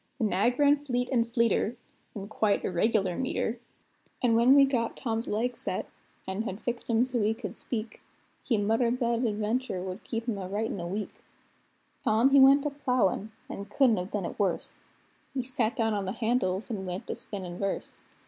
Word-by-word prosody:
The 255 - -2
nag 210 +6 +2
ran 290 0 +4
fleet 245 -3 -1
and 235 -2 +1
fleeter, 235 -1 +2 0.4
in 200 -1 -6
quite 215 -1 +1
irregular 190 0 +1
metre; 245 -1 -2 0.6
An' 240 -2 +4
when 235 +4 +6
we 280 -1 +8
got 245 -4 -1
Tom's 225 -2 -2
leg 240 +4 -1
set, - - -3 0.4
an' 190 +2 -2
had 210 -3 -4
fixed 240 0 -4
him 230 +1 +3
so 250 -3 -1
he 215 +2 +2
could 215 -5 -6
speak, 220 -2 -4 0.4
He 230 - +1
muttered 230 +4 +1
that 235 -1 +1
that 240 - +2
adventur' 215 0 -1
would 185 +2 -6
keep 230 0 -4
him 215 -4 -1
a 185 - -5
writin' 210 0 -2
a 170 - -4
week. 200 +3 -5 0.8
Tom 230 +5 +4
he 280 - +7
went 275 +2 +7
a 295 - 0
ploughin', 250 -7 0 0.2
and 200 +1 -7
couldn't 240 -1 +4
have 180 +1 -3
done 205 -4 -2
it - - -6
worse; 195 -4 -1 0.5
He 260 - 0
sat 245 -2 0
down 225 -3 +1
on 200 -2 -1
the 190 - -2
handles, 225 -3 0
an' 190 -4 -4
went 180 +1 -4
to - - -3
spinnin' 180 -4 -6
verse. 195 -1 -3
225 Hz, 195 wpm, -28 LUFS, 200-245 Hz, 0.8 s, we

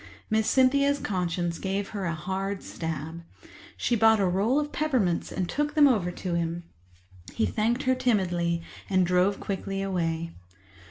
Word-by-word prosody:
Miss 220 0 +2
Cynthia's 280 +2 +4
conscience 175 -6 -2
gave 195 +1 -2
her 200 -3 -4
a 165 -1 -1
hard 190 +4 -3
stab. 160 0 -5 0.6
She 240 - +1
bought 220 -1 +5
a 195 - +3
roll 200 +10 +2
of 295 0 -3
peppermints 250 - 0
and 185 - -2
took 295 - -2
them 295 -2 +7
over 210 -9 +2
to 180 0 -4
him. 170 0 -2 0.7
He 225 - +2
thanked 235 +4 0
her 260 - +3
timidly 175 -9 0 0.3
and 185 -2 +3
drove 180 +3 +2
quickly 195 0 -3
away. 165 -3 -2
195 Hz, 155 wpm, -27 LUFS, 175-230 Hz, 0.7 s, them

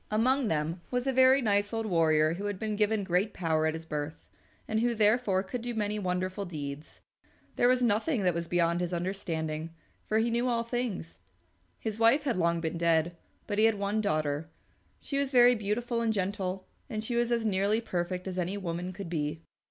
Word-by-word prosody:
Among 255 +4 +2
them 160 +1 -1
was 250 0 -1
a 270 - +1
very 260 +1 +5
nice 205 -1 +2
old 225 -1 -2
warrior 160 -4 +3
who 195 +4 -5
had 205 -2 -3
been 215 +1 -2
given 210 0 +1
great 190 +3 0
power 160 -2 +1
at 160 - -1
his 160 0 -7
birth, 150 0 -5 0.4
and 220 - 0
who, 240 +1 +1
therefore, 210 -3 +3
could 235 +5 -5
do 240 0 -4
many 210 -1 -1
wonderful 185 +1 -2
deeds. 150 -4 -7 0.5
There 245 - +3
was 250 0 +3
nothing 225 +2 +1
that 180 -1 +3
was 170 0 -3
beyond 170 0 +1
his 175 0 -2
understanding, 165 -3 -3 0.3
for 215 - +1
he 230 +1 +2
knew 240 +2 +1
all 235 -2 +1
things. 230 - -4 0.6
His 220 0 -4
wife 235 +6 +5
had 265 -9 0
long 170 -1 +2
been 165 0 -3
dead, 170 0 +2 0.3
but 205 -1 -2
he 220 - +6
had 225 -1 +4
one 200 +2 -1
daughter. 155 -4 -1 0.5
She 275 - -2
was 280 -1 -1
very 245 -1 +7
beautiful 230 +2 -1
and 230 -1 +1
gentle, 190 -2 -2 0.2
and 215 0 -3
she 235 +2 -2
was 240 0 +1
as 230 -1 +1
nearly 205 +1 +2
perfect 180 -4 -3
as 185 -1 -3
any 180 +3 -2
woman 180 -1 -4
could 195 -1 -7
be. 155 -1 -3
200 Hz, 200 wpm, -29 LUFS, 170-225 Hz, 0.6 s, very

